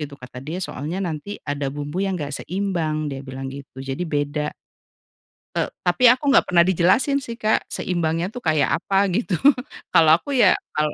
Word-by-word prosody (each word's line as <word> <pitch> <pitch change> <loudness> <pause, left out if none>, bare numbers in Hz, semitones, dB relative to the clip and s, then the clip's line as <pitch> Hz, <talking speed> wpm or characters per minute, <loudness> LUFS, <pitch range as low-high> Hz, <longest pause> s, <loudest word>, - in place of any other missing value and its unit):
gitu, 145 -2 -6
kata 125 -1 -10
dia 155 +5 -5
soalnya 160 +2 -4
nanti 170 +4 -5
ada 145 -1 -2
bumbu 145 +5 -4
yang 195 -1 -1
nggak 145 -4 -5
seimbang, 165 -6 -2
dia 135 - -5
bilang 135 0 -6
gitu. 135 -1 -10
Jadi 135 +6 -3
beda. 150 0 -1 1.0
E - - 0
tapi 175 +8 +1
aku 255 +4 0
nggak 275 - +5
pernah 170 -1 +5
dijelasin 190 - +3
sih, 235 -2 -7
Kak, 215 -1 +2
seimbangnya 170 -1 -1
tuh 245 - -7
kayak 155 -2 +2
apa, 195 0 +2
gitu. 210 -4 0 0.6
Kalau 160 -1 +6
aku 280 +10 -5
ya, 245 - +6 0.2
kalau 150 0 +1
160 Hz, 175 wpm, -22 LUFS, 145-190 Hz, 1.0 s, Kalau